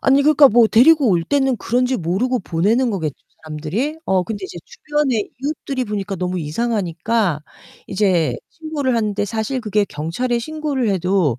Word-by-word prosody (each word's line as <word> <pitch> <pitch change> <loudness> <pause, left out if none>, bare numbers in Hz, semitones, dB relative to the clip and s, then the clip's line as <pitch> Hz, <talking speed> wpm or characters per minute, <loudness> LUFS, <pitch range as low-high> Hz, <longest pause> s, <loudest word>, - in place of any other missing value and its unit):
아니 270 +1 +4
그러니까 295 -1 +6
뭐 230 +1 +5
데리고 280 +4 +5
올 170 -3 +1
때는 270 +3 +1
그런지 250 +3 0
모르고 205 +9 0
보내는 215 +9 +1
거겠죠, 160 -8 -3 0.3
사람들이? 160 - -3
어 185 -1 +2
근데 200 0 -5
이제 175 - -8
주변에 290 -8 -1
이웃들이 275 -3 -3
보니까 205 -2 -4
너무 180 0 -2
이상하니까 190 0 -1 0.5
이제 185 -5 +1
신고를 300 -6 -2
하는데 210 -2 0
사실 220 +5 -2
그게 210 -2 +1
경찰에 200 +11 -2
신고를 295 -2 -2
해도 180 - +1
220 Hz, 375 characters per minute, -19 LUFS, 180-260 Hz, 0.5 s, 그러니까